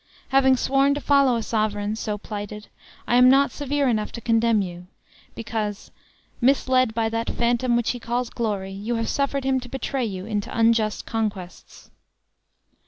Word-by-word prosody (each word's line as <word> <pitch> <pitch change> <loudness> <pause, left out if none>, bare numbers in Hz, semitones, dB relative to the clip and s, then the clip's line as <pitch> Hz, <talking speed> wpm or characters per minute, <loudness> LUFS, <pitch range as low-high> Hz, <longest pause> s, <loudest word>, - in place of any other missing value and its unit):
Having 265 -1 +4
sworn 275 +2 +2
to - - -2
follow 275 -4 +3
a 230 - -2
sovereign 215 -1 -1
so 215 -1 -3
plighted, 210 0 -7 0.4
I 240 - +3
am 250 0 +7
not 275 +2 +4
severe 285 -1 -1
enough 215 -4 0
to - - -5
condemn 230 -2 +2
you, 175 -1 -8 0.5
because, 215 -3 -4 0.5
misled 255 -2 +2
by 225 -1 +1
that 230 +1 -2
phantom 240 +1 +1
which 235 -1 +1
he 245 - -6
calls 240 +1 -2
glory, 205 -5 -3
you 205 +5 -3
have 230 0 -2
suffered 280 -1 -1
him 265 0 +1
to 250 0 -10
betray 270 0 -2
you 190 -3 -5
into 210 -2 -3
unjust 225 -2 +2
conquests." 210 -5 -5
230 Hz, 165 wpm, -23 LUFS, 215-255 Hz, 0.5 s, am